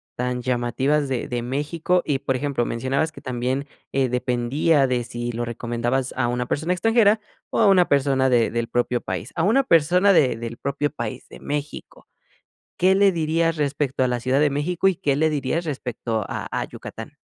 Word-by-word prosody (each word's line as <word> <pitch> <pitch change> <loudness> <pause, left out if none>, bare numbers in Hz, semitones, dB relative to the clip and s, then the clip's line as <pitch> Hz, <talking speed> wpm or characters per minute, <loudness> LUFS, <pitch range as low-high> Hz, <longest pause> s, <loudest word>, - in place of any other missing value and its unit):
tan 125 0 -2
llamativas 130 +4 0
de 130 -3 -2
de 120 -1 -3
México 150 +7 0
y 145 -3 0
por 135 -1 -1
ejemplo 130 -2 -1
mencionabas 130 +7 -1
que - - -13
también, 130 +2 -2 0.2
eh, 135 -1 +1
dependía 125 +4 +1
de 125 -1 0
si 120 0 -4
lo 120 +1 -3
recomendabas 120 +2 -2
a 125 -2 +1
una 125 0 -2
persona 160 +7 0
extranjera, 220 +2 +3 0.3
o - - 0
a 225 - +5
una 185 -3 +5
persona 135 -1 +2
de 120 -2 +3
del 115 0 -2
propio 120 0 0
país. 95 +4 -5
A 165 - 0
una 230 +9 +4
persona 180 - +4
de 135 -9 +4
del 115 0 -6
propio 140 +1 -1
país 120 -2 -6
de - - -12
México, 145 0 -6 0.7
¿qué 190 +1 +3
le 200 0 +5
dirías 165 0 0
respecto 145 -3 -1
a - - +2
la 125 -1 -1
Ciudad 130 +3 +1
de 150 0 +4
México 165 +6 0
y 190 - +2
qué 140 -3 0
le 155 +2 +2
dirías 150 +3 -1
respecto 120 - -3
a - - -4
a - - -1
Yucatán? - - -9
135 Hz, 190 wpm, -23 LUFS, 120-160 Hz, 0.7 s, a